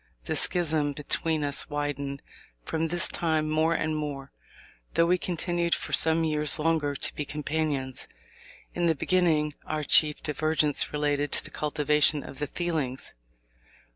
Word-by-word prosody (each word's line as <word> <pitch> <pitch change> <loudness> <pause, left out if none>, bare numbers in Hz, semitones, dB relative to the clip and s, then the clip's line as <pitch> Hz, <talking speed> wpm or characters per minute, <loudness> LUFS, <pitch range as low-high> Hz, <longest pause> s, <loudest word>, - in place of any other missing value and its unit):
The - - -2
schism 155 -4 +2
between 155 +2 0
us 145 +1 -2
widened 145 -1 -3 0.4
from 160 0 -1
this 175 +2 +2
time 160 -2 0
more 160 +2 +2
and 155 0 -1
more, 145 -3 -5 0.6
though 165 - +5
we 180 +1 +2
continued 175 -1 0
for - - -6
some 160 0 +4
years 150 -2 +3
longer 155 -2 0
to - - -3
be 150 - -3
companions. 145 -3 -2 0.7
In 175 -1 0
the 165 - +3
beginning, 155 -2 +1
our 155 -1 -3
chief 150 +1 +3
divergence 155 -1 +1
related 145 -1 0
to - - +1
the - - -11
cultivation 150 0 +2
of 135 - -10
the 150 - -2
feelings. 150 -6 -3
150 Hz, 145 wpm, -27 LUFS, 145-160 Hz, 0.7 s, though